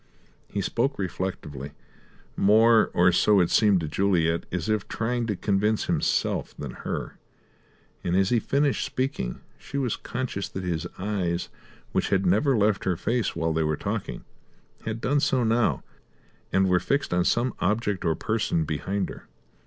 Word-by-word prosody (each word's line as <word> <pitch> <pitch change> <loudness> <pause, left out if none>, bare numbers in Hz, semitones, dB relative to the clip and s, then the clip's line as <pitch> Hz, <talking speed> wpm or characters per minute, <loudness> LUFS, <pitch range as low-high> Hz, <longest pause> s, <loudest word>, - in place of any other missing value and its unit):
He 100 - -3
spoke 130 +8 0
reflectively; 80 -7 -4 0.6
more, 110 +2 +5
or 90 +1 +5
so 100 +3 +4
it 90 - +2
seemed 105 -5 +4
to 80 - -3
Juliet, 85 -1 +1
as 90 -2 -2
if 110 -2 0
trying 120 +1 -1
to 105 - -1
convince 105 +3 +1
himself - - 0
than - - -5
her; - - -5 0.8
and 90 - 0
as 95 +1 +3
he 120 - +3
finished 140 +4 +1
speaking, 130 - -3 0.2
she 140 - -6
was 130 -5 0
conscious 120 -6 -4
that 95 - -5
his 85 -3 -2
eyes, 95 -3 -2 0.4
which - - 0
had 95 -1 +2
never 115 +9 +3
left 105 -1 +2
her 90 -3 +1
face 115 +1 -1
while 80 -1 0
they 80 - +1
were 75 -1 0
talking, 60 - -4 0.6
had 110 +1 -3
done 145 +3 +2
so 130 -3 +2
now, 115 0 +1 0.7
and 95 0 +3
were 90 -1 +3
fixed 140 -3 -1
on 90 0 +3
some 120 +7 +1
object 105 0 0
or 80 -2 +1
person 105 -4 0
behind 95 +6 -2
her. - - -10
100 Hz, 160 wpm, -26 LUFS, 90-115 Hz, 0.8 s, more